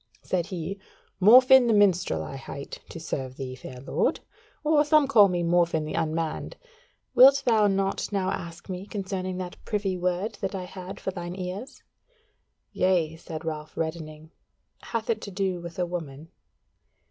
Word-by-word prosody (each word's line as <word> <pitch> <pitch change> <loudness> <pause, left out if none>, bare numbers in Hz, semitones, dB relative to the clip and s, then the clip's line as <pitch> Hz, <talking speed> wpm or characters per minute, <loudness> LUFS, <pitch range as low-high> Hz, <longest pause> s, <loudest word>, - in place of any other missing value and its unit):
Said 175 -2 -1
he, 185 0 -5 0.4
"Morfinn 255 +4 +8
the 225 - +3
Minstrel 180 - +3
I 105 - -7
hight, 140 +1 -8
to 165 - -8
serve 130 -5 -5
thee, 130 -2 -5
fair 130 0 -10
lord. 135 - 0 0.4
Or 300 -1 +4
some 300 -1 +4
call 215 -7 +7
me 175 -2 -1
Morfinn 170 -2 +2
the 155 - -5
Unmanned. 160 0 -2 0.6
Wilt 275 +2 +7
thou 220 -4 +4
not 195 +1 -1
now 190 -2 0
ask 170 -1 -6
me 185 +1 -6
concerning 190 -3 -4
that 180 -1 -7
privy 200 -3 -1
word 180 +4 -2
that 195 +1 -2
I 185 - -4
had 185 +1 -8
for 190 - -3
thy 175 -2 -6
ears?" 185 +8 -6 0.9
"Yea," 175 -4 +1
said 160 0 -8
Ralph 155 -1 -5
reddening, 160 -1 -5 0.5
"hath 230 -2 -3
it 220 -2 0
to - - -6
do 190 -2 -2
with 170 -1 -9
a 180 - +1
woman?" 160 -3 -6
180 Hz, 160 wpm, -26 LUFS, 165-200 Hz, 0.9 s, Morfinn